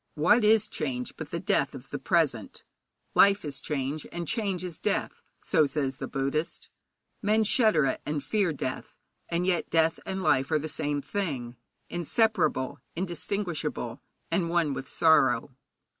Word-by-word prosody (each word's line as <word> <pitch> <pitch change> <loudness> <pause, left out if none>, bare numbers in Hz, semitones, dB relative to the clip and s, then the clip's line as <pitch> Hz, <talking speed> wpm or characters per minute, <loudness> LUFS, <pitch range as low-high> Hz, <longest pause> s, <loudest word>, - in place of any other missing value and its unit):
What 195 +9 +4
is 215 0 +5
change 125 -9 -3
but - - -7
the - - -3
death - - +1
of - - -11
the - - -3
present? - - 0 0.5
Life 200 -3 +5
is 145 -2 -4
change, 145 +1 -3
and 170 -1 -5
change 195 -4 -1
is 175 -3 -5
death, - - -1 0.2
so 155 -3 +2
says 135 -2 -2
the - - -5
Buddhist. 145 +5 -2 0.5
Men 215 +1 +3
shudder 215 - +4
at 130 - -1
and 150 -1 -3
fear 200 -2 +1
death, 130 -3 -5 0.3
and 170 +1 0
yet 180 -3 0
death 165 0 +2
and 190 0 -3
life 135 -4 +2
are 155 - +3
the 155 +1 -3
same 145 -1 -1
thing 140 -8 -3 0.3
inseparable, 175 - +1 0.2
indistinguishable, 170 - -3 0.3
and 170 0 +1
one 165 -4 +1
with 135 -1 -5
sorrow. 135 -5 +3
160 Hz, 155 wpm, -28 LUFS, 140-190 Hz, 0.5 s, is